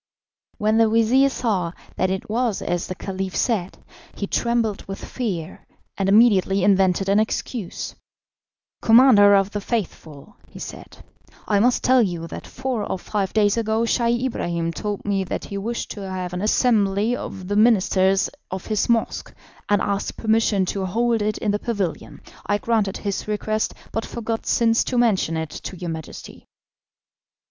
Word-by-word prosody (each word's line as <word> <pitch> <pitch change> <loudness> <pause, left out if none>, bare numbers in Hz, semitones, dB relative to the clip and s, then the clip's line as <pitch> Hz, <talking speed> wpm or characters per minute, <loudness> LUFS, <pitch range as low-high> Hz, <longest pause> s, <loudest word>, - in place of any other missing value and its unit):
When 215 +1 +2
the 225 -1 +5
vizir 230 +5 +4
saw 195 -10 -1 0.2
that 185 - 0
it 190 0 -3
was 230 -1 -1
as 175 0 -2
the 185 - -5
Caliph 190 0 -5
said, 200 -7 -1 0.4
he 200 - -3
trembled 230 -1 0
with 195 0 -6
fear, 190 -9 -4 0.3
and 195 -1 0
immediately 200 -3 +4
invented 195 -1 +3
an 200 +2 +4
excuse. 220 -2 -3 0.9
"Commander 225 -4 +7
of 195 0 +2
the 205 - -3
Faithful," 195 - -5
he - - -14
said, - - -9 0.5
"I 205 -2 +3
must 245 +4 +2
tell 255 0 +5
you 175 -6 -2
that - - -8
four 255 -4 -3
or 195 - -3
five 195 0 -2
days 210 0 +3
ago 220 0 0
Scheih 235 +1 +1
Ibrahim 170 -8 -2
told 205 +1 -4
me 200 -1 0
that - - -4
he 200 - -6
wished 235 +4 -4
to 195 -2 -6
have 185 -1 -4
an 180 - -3
assembly 215 0 +2
of 190 -6 -7
the 205 - -1
ministers 195 -3 +3 0.2
of 190 0 -5
his 215 +1 -1
mosque, 230 -1 0 0.4
and 205 -1 +3
asked 200 -1 -2
permission 220 -3 +2
to 190 +1 -2
hold 230 +3 +1
it 210 0 -1
in 210 - -1
the 205 - -1
pavilion. 200 -9 -4 0.3
I 205 - +2
granted 210 -3 0
his 200 0 -4
request, 215 +1 -1 0.2
but 225 - -3
forgot 225 -1 -4
since 230 -1 +3
to 250 - -2
mention 200 -9 +2
it 160 -1 -4
to 185 - -7
your 175 -1 -4
Majesty." 160 -1 -9
205 Hz, 165 wpm, -22 LUFS, 190-230 Hz, 0.9 s, Commander